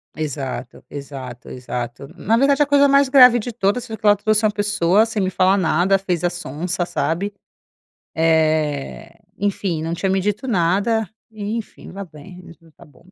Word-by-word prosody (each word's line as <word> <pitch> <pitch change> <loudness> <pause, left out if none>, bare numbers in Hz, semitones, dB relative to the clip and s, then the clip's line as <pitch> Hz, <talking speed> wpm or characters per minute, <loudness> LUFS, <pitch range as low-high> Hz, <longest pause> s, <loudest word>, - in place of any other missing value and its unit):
Exato, 140 -4 -5
exato, 135 -4 -9
exato. 125 0 -6
Na 220 +5 +1
verdade 275 +3 +3
a - - +5
coisa 285 0 +4
mais 280 0 +4
grave 250 -3 +7
de 235 +2 -6
todas 230 +3 -1
foi 220 - -6
que 215 - -11
ela 205 0 +6
trouxe 215 +1 +1
uma 215 - +3
pessoa 205 -1 +2
sem 220 -2 -3
me 185 - 0
falar 185 +1 +2
nada, 185 +2 +2
fez 180 -3 -3
a - - +3
sonsa, 175 +2 -4
sabe? 190 +5 -2 0.8
Eh, 160 0 0 0.2
enfim 195 -5 -2
não 165 +1 -3
tinha 170 +3 -2
me 190 - +1
dito 210 +5 -2
nada. 205 +2 +1 0.2
E, 215 +1 -4
enfim 225 - -10
vá 200 +1 -7
bem 165 +2 -13
e - - -13
as 165 - -14
duas 165 -2 -23
tá - - -17
bom 145 -1 -22
190 Hz, 190 wpm, -20 LUFS, 160-215 Hz, 0.8 s, grave